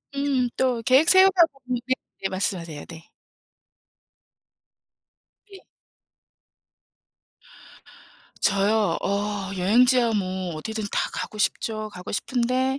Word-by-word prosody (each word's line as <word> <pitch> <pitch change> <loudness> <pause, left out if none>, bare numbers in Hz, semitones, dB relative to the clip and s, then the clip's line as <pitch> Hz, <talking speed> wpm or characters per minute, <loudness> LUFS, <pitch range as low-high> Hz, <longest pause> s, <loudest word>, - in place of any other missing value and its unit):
음 275 -3 0
또 255 -3 0
계획 275 +6 +5
세우다 375 -2 +6
보면 255 -2 -5
네 260 - +2 0.3
네 195 - 0
말씀하세요. 175 -5 -3
네. 165 -1 -12 2.4
네. 390 -1 -13 2.8
저요? 200 -1 +2
어 200 0 -2
여행지야 235 +5 +3
뭐 185 -3 -3
어디든 220 +6 -5
다 - - -1
가고 215 - -5
싶죠, 215 +1 -1
가고 180 -2 -9
싶은데 255 +4 0
220 Hz, 185 characters per minute, -24 LUFS, 195-255 Hz, 2.8 s, 세우다